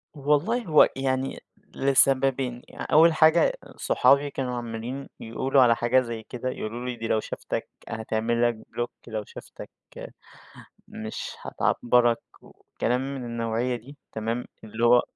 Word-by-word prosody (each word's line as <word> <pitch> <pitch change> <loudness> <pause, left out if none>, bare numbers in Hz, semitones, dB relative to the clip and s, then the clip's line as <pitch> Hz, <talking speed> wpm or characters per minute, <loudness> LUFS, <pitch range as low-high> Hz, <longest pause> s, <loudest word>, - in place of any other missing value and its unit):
والله 150 - +1
هو 155 -3 +6
يعني 135 0 -1 0.4
لسببين 135 -2 +2
يع - - -7
أول 165 +2 +7
حاجة 160 +1 +5 0.2
أ - - -16
صحابي 140 +1 +3
كانوا 130 -3 -3
عمَّالين 120 +3 -5
يقولوا 130 +4 +1
على 120 -2 +6
حاجة 120 +3 +3
زي 115 -2 -6
كده، 125 +3 -5
يقولوا 120 0 -5
لي: 125 - -3
"دي 115 -1 -5
لو 110 - +2
شافتك - - -5 0.2
هتعمل 110 +1 -1
لك 120 - -1
بلوك، 120 0 -3 0.2
لو 110 -2 -4
شافتك - - -11 1.2
مش 110 0 -6
هتعبّرك." 120 -1 +2 0.2
وكلام 125 +1 -3
من 130 -3 -6
النوعيَّة 115 +1 -1
دي 130 +5 -13 0.2
تمام، 115 +2 -3 0.2
اللي 110 +2 -3
هو 120 +1 +6
125 Hz, 140 wpm, -26 LUFS, 115-135 Hz, 1.2 s, أول